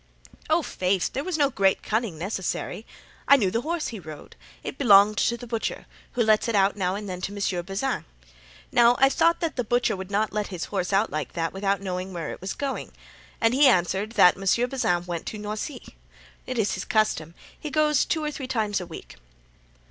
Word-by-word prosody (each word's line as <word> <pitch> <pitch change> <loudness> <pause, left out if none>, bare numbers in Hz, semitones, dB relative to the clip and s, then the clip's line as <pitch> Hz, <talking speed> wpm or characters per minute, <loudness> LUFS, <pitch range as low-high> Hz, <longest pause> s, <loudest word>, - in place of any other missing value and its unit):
"Ah, - - +3
faith! 185 0 -1
there 275 - -2
was 360 -1 -2
no 285 -2 +3
great 195 -4 +2
cunning 220 -6 -1
necessary. 190 +4 -4 0.4
I 280 - +8
knew 200 -9 +1
the 230 - 0
horse 330 +3 -2
he 225 - -7
rode; 155 -4 -11 0.3
it - - -6
belonged 210 -4 +6
to 235 - +1
the 245 - -9
butcher, 230 -1 -3 0.3
who 240 - +2
lets 215 0 +3
it 230 - 0
out 195 0 +3
now 185 -2 -1
and 205 0 -6
then 180 -1 -5
to 195 - -3
M. 195 -3 -2
Bazin. 200 +8 -2 0.7
Now 240 0 +5
I 270 - +5
thought 335 +4 +2
that 330 -4 -2
the 245 - +1
butcher 240 0 +1
would 190 0 -7
not 210 +2 0
let 210 -1 -1
his 180 -3 -5
horse 190 -2 -2
out 200 +3 +2
like 155 -1 -4
that 165 -1 -2
without 195 0 0
knowing 185 0 -4
where 165 -3 -4
it - - -9
was 190 - -3
going. 275 -2 -4 0.5
And 225 0 +3
he 280 +2 +6
answered 195 0 +2
'that 180 -6 +6
Monsieur 195 +5 +2
Bazin 180 -9 0
went 170 -2 -5
to 215 - -4
Noisy.' 215 +5 -5 0.6
'Tis 230 -5 0
his - - -4
custom. 170 -7 0 0.2
He 305 - -5
goes 300 0 +3
two 315 - -1
or 300 - -1
three 270 -3 -6
times 215 -6 -1
a 180 - -7
week." 165 - -10
210 Hz, 210 wpm, -25 LUFS, 190-245 Hz, 0.7 s, I